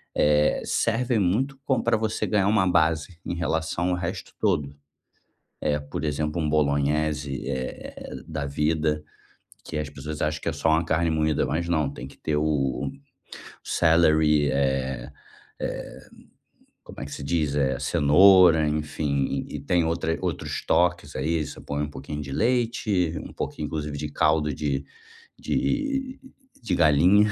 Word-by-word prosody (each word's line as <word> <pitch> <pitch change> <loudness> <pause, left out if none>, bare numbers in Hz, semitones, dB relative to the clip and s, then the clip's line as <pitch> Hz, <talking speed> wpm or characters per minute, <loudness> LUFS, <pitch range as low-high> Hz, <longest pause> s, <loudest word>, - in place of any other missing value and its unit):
eh, 75 0 +3
serve 120 0 +1
muito 120 +9 0
como 130 -4 +1
pra - - +2
você 110 0 -1
ganhar 100 -2 +2
uma 100 -3 +3
base 80 -1 +1
em 85 - -3
relação 85 +1 -1
ao 90 - +1
resto 90 0 -5
todo. 70 -1 0 0.9
Eh, 75 0 +1
por 75 +2 -5
exemplo, 75 +2 -1
um 75 - 0
bolonhese, 75 -1 0
eh 65 -1 -5
eh 65 - -8
da 75 -3 -4
vida, 75 +1 0 0.6
que 75 - -4
as 75 - -3
pessoas 75 +2 -7
acham 75 0 -1
que - - -3
é - - 0
só 80 - 0
uma 80 +2 +3
carne 80 +1 +1
moída, 80 -1 +1
mas 85 +2 -2
não, 80 -4 +1
tem 65 -1 -8
que - - -16
ter 75 -1 -1
o 75 -4 0 0.7
celery 80 -3 +3
eh, 65 -1 -1 0.5
eh, - - -5 0.9
como - - -10
é 70 - -4
que 70 - -9
se 70 - -6
diz? 75 -2 0
Eh, 65 -2 +1
cenoura, 85 +1 +6
enfim, 75 -2 -1
e - - -6
e - - -6
tem 85 +3 +1
outra 80 0 -1
outros - - -3
toques, 85 -4 +1
aí, 80 +3 0
você 75 - -9
põe 70 +1 -3
um 75 - -3
pouquinho 75 +2 -6
de 70 -1 -7
leite, 110 - +1
um - - -10
pouquinho, 75 - -4
inclusive 75 -2 -4
de 75 +1 -4
caldo 75 0 +2
de 70 -1 -2 0.6
de 275 -2 -1 0.4
de 105 -6 -1
galinha. 90 +7 +5
75 Hz, 160 wpm, -25 LUFS, 75-85 Hz, 0.9 s, cenoura